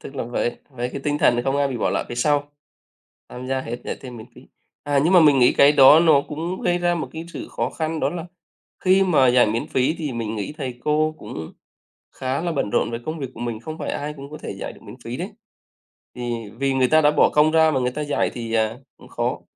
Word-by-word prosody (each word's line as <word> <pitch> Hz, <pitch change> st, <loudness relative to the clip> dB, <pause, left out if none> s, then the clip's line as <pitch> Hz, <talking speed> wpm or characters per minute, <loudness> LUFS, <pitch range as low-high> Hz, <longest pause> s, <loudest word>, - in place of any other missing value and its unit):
tức 140 Hz, -, -10 dB
là 130 Hz, -, -3 dB
với 120 Hz, 0 st, -2 dB
với 125 Hz, -1 st, -4 dB
cái 140 Hz, -, -5 dB
tinh 145 Hz, 0 st, 0 dB
thần 120 Hz, -4 st, +3 dB
không 135 Hz, +1 st, 0 dB
ai 140 Hz, -1 st, +2 dB
bị 130 Hz, -, -4 dB
bỏ -, -, 0 dB
lại -, -, -1 dB
phía 120 Hz, -, -5 dB
sau, 145 Hz, +3 st, +1 dB, 0.8 s
tham 125 Hz, +1 st, -8 dB
gia 130 Hz, 0 st, -1 dB
hết, 120 Hz, -1 st, -5 dB
dạy -, -, -4 dB
thêm 125 Hz, -2 st, -9 dB
miễn 110 Hz, 0 st, -10 dB
phí. -, -, -14 dB, 0.4 s
À, 145 Hz, -1 st, +1 dB
nhưng 175 Hz, -, +3 dB
mà 180 Hz, -, +7 dB
mình 150 Hz, -3 st, +5 dB
nghĩ 125 Hz, -, +5 dB
cái 140 Hz, +1 st, +6 dB
đó 145 Hz, +2 st, +8 dB
nó 160 Hz, -4 st, +5 dB
cũng 165 Hz, +5 st, -4 dB
gây 175 Hz, 0 st, +1 dB
ra 175 Hz, 0 st, +1 dB
một 170 Hz, -, -4 dB
cái 160 Hz, +1 st, -6 dB
sự -, -, -7 dB
khó -, -, -2 dB
khăn 160 Hz, 0 st, -3 dB
đó -, -, +1 dB
là 175 Hz, +1 st, -6 dB, 0.6 s
khi 190 Hz, +1 st, +5 dB
mà 150 Hz, -9 st, +4 dB
dạy 125 Hz, 0 st, +5 dB
miễn 110 Hz, +2 st, -2 dB
phí 130 Hz, +4 st, +1 dB
thì 150 Hz, -5 st, -3 dB
mình 115 Hz, -2 st, -4 dB
nghĩ 105 Hz, +5 st, -4 dB
thầy 130 Hz, -4 st, -5 dB
cô 155 Hz, +1 st, +1 dB
cũng 80 Hz, 0 st, -8 dB, 0.6 s
khá 130 Hz, +2 st, -2 dB
là 170 Hz, 0 st, -2 dB
bận 135 Hz, -9 st, -1 dB
rộn -, -, +1 dB
với 115 Hz, -, -4 dB
công 155 Hz, +1 st, -3 dB
việc 135 Hz, -3 st, -4 dB
của 115 Hz, -, -11 dB
mình, 120 Hz, -2 st, -4 dB
không 155 Hz, +6 st, -7 dB
phải -, -, -3 dB
ai 150 Hz, +1 st, -4 dB
cũng 140 Hz, 0 st, -10 dB
có 155 Hz, -, -8 dB
thể -, -, -5 dB
dạy -, -, -5 dB
được -, -, -17 dB
miễn -, -, -11 dB
phí 120 Hz, +2 st, -5 dB
đấy. 180 Hz, +8 st, -5 dB, 0.9 s
Thì 120 Hz, -3 st, -4 dB
vì 135 Hz, -1 st, +1 dB
người 130 Hz, -1 st, +3 dB
ta 155 Hz, 0 st, +5 dB
đã 150 Hz, -, +4 dB
bỏ -, -, +4 dB
công 150 Hz, +1 st, +3 dB
ra 160 Hz, -1 st, +4 dB
mà 135 Hz, -, +1 dB
người 125 Hz, 0 st, 0 dB
ta 150 Hz, -, -5 dB
dạy 145 Hz, -1 st, 0 dB
thì, 115 Hz, -2 st, -5 dB
à, 110 Hz, 0 st, +1 dB, 0.2 s
cũng -, -, -16 dB
khó. -, -, -2 dB
140 Hz, 265 wpm, -22 LUFS, 120-155 Hz, 0.9 s, đó